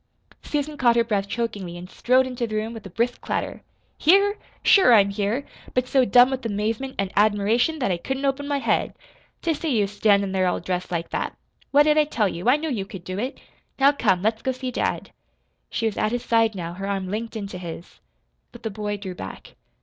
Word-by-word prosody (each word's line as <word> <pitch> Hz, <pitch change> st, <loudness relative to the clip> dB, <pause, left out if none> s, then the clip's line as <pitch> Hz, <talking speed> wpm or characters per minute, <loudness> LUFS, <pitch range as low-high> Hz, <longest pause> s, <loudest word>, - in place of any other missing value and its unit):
Susan 295 Hz, 0 st, -3 dB
caught 240 Hz, -3 st, +4 dB
her 235 Hz, -, +4 dB
breath 205 Hz, -3 st, -1 dB
chokingly, 200 Hz, -6 st, -4 dB
and 175 Hz, +1 st, -9 dB
strode 255 Hz, +6 st, +2 dB
into 250 Hz, -2 st, -3 dB
the 215 Hz, -, -4 dB
room 220 Hz, +2 st, -2 dB
with 225 Hz, -2 st, -9 dB
a -, -, -12 dB
brisk 235 Hz, +6 st, -1 dB
clatter. -, -, -3 dB, 0.4 s
"Here? 400 Hz, +5 st, +4 dB, 0.2 s
Sure 375 Hz, -, +7 dB
I'm 200 Hz, -2 st, +4 dB
here 210 Hz, +7 st, -1 dB, 0.3 s
but 255 Hz, 0 st, +1 dB
so 260 Hz, -1 st, +3 dB
dumb 250 Hz, +1 st, +6 dB
with 265 Hz, 0 st, -3 dB
amazement 225 Hz, +5 st, -2 dB
an' 195 Hz, -1 st, -1 dB
admiration 215 Hz, +8 st, +2 dB
that 250 Hz, -9 st, 0 dB
I 175 Hz, -, 0 dB
couldn't 265 Hz, +9 st, -3 dB
open 275 Hz, +1 st, -1 dB
my 285 Hz, -1 st, 0 dB
head 275 Hz, -, 0 dB, 0.5 s
to 330 Hz, -, +2 dB
see 295 Hz, -5 st, -1 dB
you 205 Hz, -, +3 dB
standin' 200 Hz, -1 st, +2 dB
there 190 Hz, -1 st, +1 dB
all 180 Hz, -, 0 dB
dressed 180 Hz, +1 st, -3 dB
like 170 Hz, -1 st, -3 dB
that! -, -, -3 dB, 0.3 s
What 290 Hz, +1 st, +6 dB
did 305 Hz, 0 st, +4 dB
I 305 Hz, -, +4 dB
tell 230 Hz, -8 st, 0 dB
you? 185 Hz, +5 st, -1 dB
I 265 Hz, -, +5 dB
knew 315 Hz, 0 st, -3 dB
you 215 Hz, -6 st, -1 dB
could 190 Hz, -2 st, -10 dB
do 185 Hz, +2 st, -5 dB
it. 255 Hz, +5 st, -4 dB, 0.4 s
Now, 275 Hz, +1 st, +6 dB
come, 195 Hz, -10 st, +1 dB
let's 220 Hz, +1 st, +1 dB
go 260 Hz, -, 0 dB
see 255 Hz, 0 st, -5 dB
dad." -, -, -2 dB, 0.6 s
She 230 Hz, -, -2 dB
was 220 Hz, -, -1 dB
at 215 Hz, -, +1 dB
his 245 Hz, -, -2 dB
side 225 Hz, -2 st, +3 dB
now, 170 Hz, -2 st, -5 dB
her 195 Hz, +2 st, -5 dB
arm 195 Hz, -2 st, -2 dB
linked 225 Hz, +4 st, -4 dB
into 200 Hz, -4 st, -5 dB
his. 170 Hz, -1 st, -9 dB, 0.5 s
But -, -, -14 dB
the 220 Hz, -, -3 dB
boy 205 Hz, 0 st, -3 dB
drew 190 Hz, -2 st, -6 dB
back. 95 Hz, -, -9 dB
225 Hz, 220 wpm, -24 LUFS, 195-260 Hz, 0.6 s, Sure